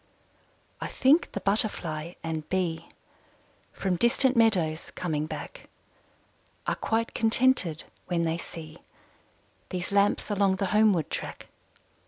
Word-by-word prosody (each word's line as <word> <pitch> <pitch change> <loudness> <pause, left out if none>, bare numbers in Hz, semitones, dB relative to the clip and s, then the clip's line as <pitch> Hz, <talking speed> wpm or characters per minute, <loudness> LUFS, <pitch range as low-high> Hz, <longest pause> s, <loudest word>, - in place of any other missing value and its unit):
I - - -3
think 285 +6 +3
the 200 - -4
Butterfly 175 -6 +3
and 160 -1 -4
Bee, 170 -3 -2 0.8
From 185 -2 -2
distant 250 +5 +3
meadows 180 -9 +2
coming 155 -4 -2
back, 155 -2 -8 1.0
Are - - 0
quite 225 +1 -2
contented 225 -8 +2 0.2
when 175 -2 0
they 165 0 -1
see 160 -1 -9 0.9
These 180 +1 -4
lamps 200 +1 +1
along 200 -2 +2
the 195 - -2
homeward 210 -7 +3
track. - - -6
185 Hz, 115 wpm, -27 LUFS, 165-215 Hz, 1.0 s, think